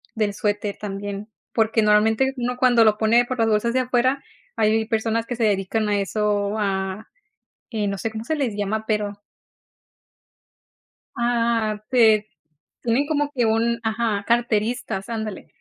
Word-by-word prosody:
del 210 -2 0
suéter 205 0 -2
también. 200 +1 -6 0.2
Porque 225 0 +2
normalmente 220 +5 +3
uno 245 0 -2
cuando 245 -2 +5
lo 215 -1 +4
pone 225 +2 +4
por 255 0 -4
las 225 - +3
bolsas 220 +2 +2
de 260 - +2
afuera 255 +2 +1 0.4
hay 220 0 +2
personas 225 0 -1
que 245 - -4
se 235 - -1
dedican 210 +1 0
a 205 -1 +1
eso, 205 +1 0
a, 195 0 -2 0.6
eh, 215 -4 -1
no 200 0 -3
se 225 - -2
como 220 0 -6
se 315 - -1
les 265 -7 -1
llama 210 +2 -2
pero 210 -2 -2 2.0
Ah 230 -3 0
te, 220 -4 +4 0.5
tienen 245 +5 +1
como 290 -2 0
que 245 -4 +1
un, 230 +1 +1
ajá, 220 -2 -1
carteristas, 230 -3 0
ándale. 220 -3 -5
220 Hz, 150 wpm, -23 LUFS, 210-235 Hz, 2.0 s, cuando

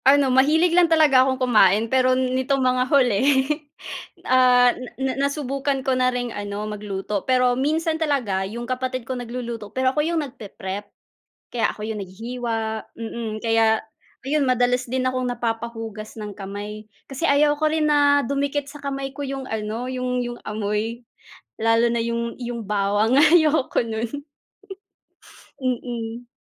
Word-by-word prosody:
Ano, 270 -1 +5
mahilig 310 +6 +4
lang 350 -1 +5
talaga 305 -5 +5
akong 260 0 +2
kumain, 220 -5 +4
pero 255 +1 +2
nitong 260 +2 0
mga 255 0 +3
huli, 250 -8 +3 1.0
ah, 250 -1 +5
na 255 0 -8
na 265 0 -1 0.2
nasubukan 275 -1 -2
ko 265 - +2
na 255 0 +3
ring 245 -1 -3
ano, 205 0 -4
magluto, 205 -1 -4
pero 250 +1 +2
minsan 315 +5 0
talaga 255 -11 0
'yong 235 +3 -6
kapatid 255 -1 -3
ko 260 - -3
nagluluto, 235 -3 -5
pero 260 0 0
ako 300 - +1
'yong 325 +1 0
nagpe-prep. 205 -5 -7 0.6
Kaya 235 -2 +1
ako 210 - -8
'yong 215 -1 -3
naghihiwa, 230 +5 -4 0.4
mm, 230 0 -5
kaya, 225 -1 +3 0.4
ayun 280 +1 +1
madalas 250 0 +2
din 255 +1 -1
akong 255 0 0
napapa-hugas 225 -2 -4
ng 210 -2 -6
kamay. 205 +2 -7 0.2
Kasi 275 +6 -1
ayaw 295 +1 +3
ko 310 - +3
rin 310 0 +1
na 285 -1 +4
dumikit 280 +2 -2
sa 295 - -11
kamay 275 -1 -4
ko 275 - -15
'yong 270 -1 -5
ano, 220 +3 -3
'yong 250 -1 -1
'yong 240 0 -6
amoy, 215 +3 -2 0.6
lalo 225 +1 +3
na 235 - 0
'yong 235 +1 -3
'yong 240 -2 -4
bawang, 205 +3 +1
ayoko 310 -2 +4
no'n, 225 0 -3 1.6
mm. 240 -1 -3
250 Hz, 150 wpm, -23 LUFS, 225-270 Hz, 1.6 s, Ano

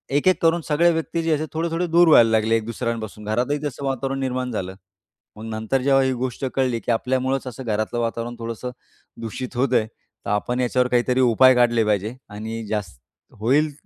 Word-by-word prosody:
एक-एक 185 +6 +3
करून 165 +1 +3
सगळे 170 +3 +3
व्यक्ती 165 +1 -2
जे 165 - 0
असे 155 - -3
थोडे-थोडे 165 +2 -1
दूर 170 +1 +5
व्हायला 115 -7 +7
लागले, 110 +1 +2
एक 110 - -1
दुसऱ्यांपासून 115 -2 -4
घरातही 120 +7 0
तसं 140 0 -4
वातावरण 135 0 -2
निर्माण 130 -1 -2
झालं. 95 -4 -4 0.6
मग 110 - -9
नंतर 110 +4 -1
जेव्हा 135 0 +4
ही 130 0 +1
गोष्ट 130 +1 -3
कळली, 130 -3 +1
की - - -2
आपल्यामुळेच 130 +3 0
असं 130 +1 -7
घरातलं 110 +1 -1
वातावरण 115 +1 -3
थोडंसं 115 +2 -5 0.5
दूषित 120 +3 -6
होतंय, 125 -4 +2
तर 110 - -14
आपण 120 +4 -1
याच्यावर 125 0 +1
काहीतरी 125 +1 +1
उपाय 130 +1 +6
काढले 120 -2 +3
पाहिजे 105 +2 0
आणि 110 +2 -6
जास्त 95 - -4 0.4
होईल 140 +8 +2
125 Hz, 180 wpm, -22 LUFS, 115-135 Hz, 0.6 s, व्हायला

